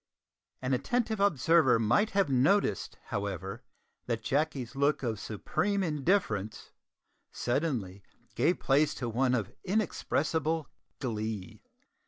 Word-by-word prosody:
An 130 Hz, +1 st, 0 dB
attentive 220 Hz, -, 0 dB
observer 165 Hz, -7 st, +4 dB
might 120 Hz, -, +2 dB
have 200 Hz, -, +4 dB
noticed, 135 Hz, -, +2 dB
however, 95 Hz, -1 st, -4 dB, 0.5 s
that 115 Hz, -2 st, -2 dB
Jacky's 140 Hz, -2 st, -1 dB
look 140 Hz, +1 st, +1 dB
of 110 Hz, -4 st, -2 dB
supreme 195 Hz, -, -1 dB
indifference 150 Hz, -, 0 dB, 0.6 s
suddenly 120 Hz, -, -2 dB, 0.3 s
gave 175 Hz, -, +2 dB
place 145 Hz, +3 st, +2 dB
to 125 Hz, -, -3 dB
one 125 Hz, +2 st, +2 dB
of 110 Hz, -6 st, -2 dB
inexpressible 160 Hz, -5 st, 0 dB, 0.3 s
glee. 110 Hz, -5 st, -4 dB
135 Hz, 105 wpm, -30 LUFS, 110-165 Hz, 0.6 s, observer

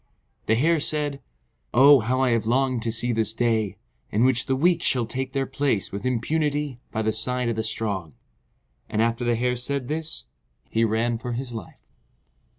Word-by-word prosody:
The 110 Hz, -, +4 dB
Hare 160 Hz, +7 st, +3 dB
said, 145 Hz, -2 st, -1 dB, 0.5 s
"Oh, 140 Hz, +2 st, +8 dB
how 125 Hz, +3 st, 0 dB
I 130 Hz, -2 st, +3 dB
have 115 Hz, -1 st, 0 dB
longed 130 Hz, 0 st, +1 dB
to 115 Hz, 0 st, -1 dB
see 120 Hz, +2 st, +1 dB
this 110 Hz, -1 st, 0 dB
day, 110 Hz, -5 st, 0 dB, 0.3 s
in 110 Hz, +3 st, +1 dB
which 130 Hz, -1 st, +3 dB
the 135 Hz, -, +1 dB
weak 170 Hz, +4 st, +2 dB
shall 125 Hz, -7 st, +2 dB
take 130 Hz, +3 st, -4 dB
their 135 Hz, -1 st, 0 dB
place 135 Hz, -6 st, -1 dB
with 100 Hz, +5 st, -4 dB
impunity 145 Hz, +2 st, -1 dB
by 110 Hz, -, -2 dB
the 110 Hz, 0 st, +1 dB
side 125 Hz, +2 st, 0 dB
of 115 Hz, -, -1 dB
the 110 Hz, -, -1 dB
strong." 100 Hz, -8 st, -3 dB, 0.7 s
And 105 Hz, -, -2 dB
after 115 Hz, +2 st, +1 dB
the 120 Hz, -1 st, +1 dB
Hare 125 Hz, +2 st, 0 dB
said 125 Hz, +1 st, -2 dB
this, 155 Hz, -, -2 dB, 0.5 s
he 115 Hz, -, +2 dB
ran 115 Hz, +1 st, 0 dB
for 120 Hz, +1 st, -4 dB
his 120 Hz, 0 st, -4 dB
life. 110 Hz, -7 st, -10 dB
120 Hz, 185 wpm, -24 LUFS, 110-135 Hz, 0.7 s, Oh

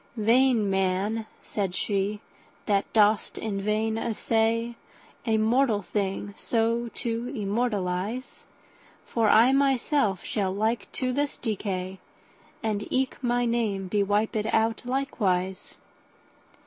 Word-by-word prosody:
Vain 230 Hz, 0 st, +4 dB
man 195 Hz, +3 st, 0 dB, 0.2 s
(said 195 Hz, -3 st, -2 dB
she) 205 Hz, +1 st, -1 dB, 0.4 s
that 200 Hz, -2 st, +1 dB
dost 215 Hz, 0 st, +3 dB
in 200 Hz, -3 st, -3 dB
vain 220 Hz, +2 st, 0 dB
assayA 230 Hz, +1 st, 0 dB, 0.6 s
mortal 220 Hz, -1 st, +2 dB
thing 200 Hz, +1 st, -2 dB
so 230 Hz, +1 st, 0 dB
to 235 Hz, 0 st, -2 dB
immortalise; 210 Hz, +1 st, -2 dB, 0.6 s
For 225 Hz, -3 st, +1 dB
I 235 Hz, +5 st, +6 dB
myself 270 Hz, -, +2 dB
shall 195 Hz, -3 st, -1 dB
like 220 Hz, 0 st, -1 dB
to 255 Hz, -1 st, -1 dB
this 285 Hz, +2 st, -1 dB
decay, 190 Hz, -4 st, -3 dB, 0.6 s
And 210 Hz, -2 st, -1 dB
eke 265 Hz, +1 st, 0 dB
my 245 Hz, 0 st, +2 dB
name 220 Hz, -5 st, 0 dB
be 205 Hz, +2 st, +1 dB
wipèd 210 Hz, +2 st, 0 dB
out 225 Hz, +1 st, +2 dB
likewise. 200 Hz, -8 st, -1 dB
220 Hz, 110 wpm, -27 LUFS, 200-235 Hz, 0.6 s, I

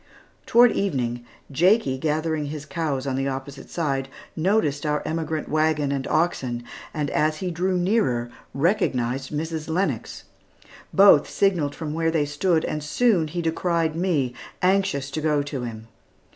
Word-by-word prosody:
Toward 240 Hz, 0 st, +6 dB
evening, 125 Hz, -11 st, -1 dB, 0.3 s
Jakie 170 Hz, -, +3 dB
gathering 155 Hz, +1 st, -1 dB
his 150 Hz, 0 st, -6 dB
cows 150 Hz, -4 st, -2 dB
on 135 Hz, -2 st, -1 dB
the 135 Hz, +1 st, -1 dB
opposite 135 Hz, +1 st, -6 dB
side, 135 Hz, -5 st, -2 dB, 0.3 s
noticed 160 Hz, -5 st, +1 dB
our 150 Hz, -1 st, 0 dB
emigrant 160 Hz, -1 st, -2 dB
wagon, 155 Hz, -2 st, +1 dB
and 135 Hz, -1 st, -2 dB
oxen, 130 Hz, -8 st, 0 dB, 0.3 s
and 150 Hz, -2 st, -2 dB
as 155 Hz, 0 st, +1 dB
he 180 Hz, +2 st, -3 dB
drew 180 Hz, +2 st, 0 dB
nearer 175 Hz, -, +1 dB, 0.2 s
recognized 135 Hz, -, 0 dB
Mrs. 160 Hz, +1 st, -3 dB
Lennox. 180 Hz, +5 st, -2 dB, 0.7 s
Both 195 Hz, -7 st, +6 dB
signalled 175 Hz, -8 st, +1 dB
from 155 Hz, -2 st, -5 dB
where 165 Hz, 0 st, +1 dB
they 160 Hz, -2 st, +1 dB
stood, 160 Hz, +3 st, +1 dB
and 150 Hz, -, -3 dB
soon 180 Hz, 0 st, +2 dB
he 170 Hz, +3 st, -4 dB
descried 165 Hz, -1 st, 0 dB
me, 160 Hz, -8 st, 0 dB, 0.3 s
anxious 180 Hz, -8 st, +1 dB
to 155 Hz, -, -3 dB
go 150 Hz, -2 st, +1 dB
to 140 Hz, -2 st, -5 dB
him. 110 Hz, -1 st, -8 dB
155 Hz, 145 wpm, -24 LUFS, 140-170 Hz, 0.7 s, Toward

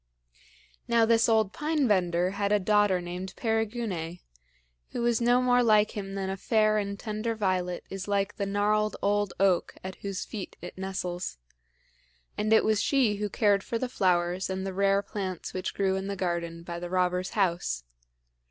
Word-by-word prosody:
Now 235 Hz, -1 st, +4 dB
this 230 Hz, 0 st, +4 dB
old 220 Hz, -3 st, +3 dB
Pine 300 Hz, -3 st, 0 dB
bender 180 Hz, -3 st, +2 dB
had 200 Hz, 0 st, -1 dB
a 210 Hz, -, +5 dB
daughter 205 Hz, -2 st, +3 dB
named 180 Hz, +2 st, -6 dB
Perigune, 220 Hz, -7 st, -2 dB, 0.8 s
who -, -, -2 dB
was 235 Hz, -1 st, +2 dB
no 245 Hz, +1 st, +4 dB
more 245 Hz, 0 st, +4 dB
like 215 Hz, -2 st, +4 dB
him 195 Hz, -1 st, -5 dB
than 195 Hz, -1 st, -2 dB
a 190 Hz, 0 st, -3 dB
fair 215 Hz, +1 st, +2 dB
and 200 Hz, -1 st, -4 dB
tender 215 Hz, +1 st, -3 dB
violet 185 Hz, -4 st, -1 dB
is 195 Hz, 0 st, -5 dB
like 200 Hz, 0 st, 0 dB
the 200 Hz, -, -1 dB
gnarled 210 Hz, +1 st, +1 dB
old 205 Hz, -1 st, +1 dB
oak 190 Hz, -3 st, +2 dB
at 185 Hz, 0 st, -6 dB
whose 195 Hz, -1 st, -4 dB
feet 205 Hz, -4 st, -7 dB
it -, -, -9 dB
nestles; 185 Hz, -, -4 dB, 1.0 s
and 215 Hz, +1 st, -1 dB
it 220 Hz, -, +5 dB
was 215 Hz, -1 st, +2 dB
she 250 Hz, -7 st, +2 dB
who 210 Hz, 0 st, -2 dB
cared 200 Hz, -1 st, +2 dB
for 230 Hz, -, -2 dB
the 255 Hz, -, -2 dB
flowers 180 Hz, -4 st, +1 dB
and 190 Hz, 0 st, -3 dB
the 190 Hz, -, -3 dB
rare 195 Hz, +1 st, +2 dB
plants 190 Hz, -5 st, -5 dB
which 185 Hz, -, -3 dB
grew 190 Hz, -1 st, +1 dB
in 190 Hz, 0 st, -3 dB
the 200 Hz, -, -3 dB
garden 170 Hz, -3 st, -3 dB
by 170 Hz, 0 st, -5 dB
the 175 Hz, 0 st, -6 dB
robber's 180 Hz, 0 st, 0 dB
house. 170 Hz, -, 0 dB
200 Hz, 180 wpm, -28 LUFS, 185-215 Hz, 1.0 s, a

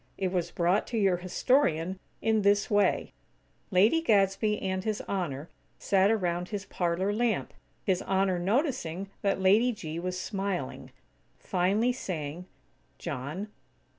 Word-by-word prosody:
It 190 Hz, -2 st, -1 dB
was 175 Hz, -2 st, -1 dB
brought 175 Hz, +4 st, +1 dB
to 235 Hz, -, -3 dB
your 195 Hz, -4 st, +3 dB
historian 185 Hz, -, +1 dB, 0.2 s
in 220 Hz, -1 st, +3 dB
this 205 Hz, +1 st, +2 dB
way: 205 Hz, -2 st, +2 dB, 0.6 s
Lady 215 Hz, -, +4 dB
Gadsby 210 Hz, -, +2 dB
and 190 Hz, -1 st, -2 dB
His 215 Hz, -1 st, -1 dB
Honor 160 Hz, -7 st, -3 dB, 0.3 s
sat 195 Hz, 0 st, +3 dB
around 180 Hz, -5 st, 0 dB
his 205 Hz, -2 st, -4 dB
parlor 180 Hz, +3 st, -1 dB
lamp, 230 Hz, 0 st, 0 dB, 0.3 s
His 185 Hz, -2 st, +1 dB
Honor 190 Hz, -1 st, +1 dB
noticing 195 Hz, -, -1 dB
that 200 Hz, -1 st, +1 dB
Lady 210 Hz, +6 st, +4 dB
G. 165 Hz, -7 st, -5 dB
was 180 Hz, +1 st, -3 dB
smiling, 195 Hz, -1 st, -3 dB, 0.5 s
finally 200 Hz, +6 st, +1 dB
saying: 175 Hz, -, -5 dB, 0.5 s
"John." 150 Hz, +11 st, -5 dB
190 Hz, 130 wpm, -29 LUFS, 180-210 Hz, 0.6 s, Lady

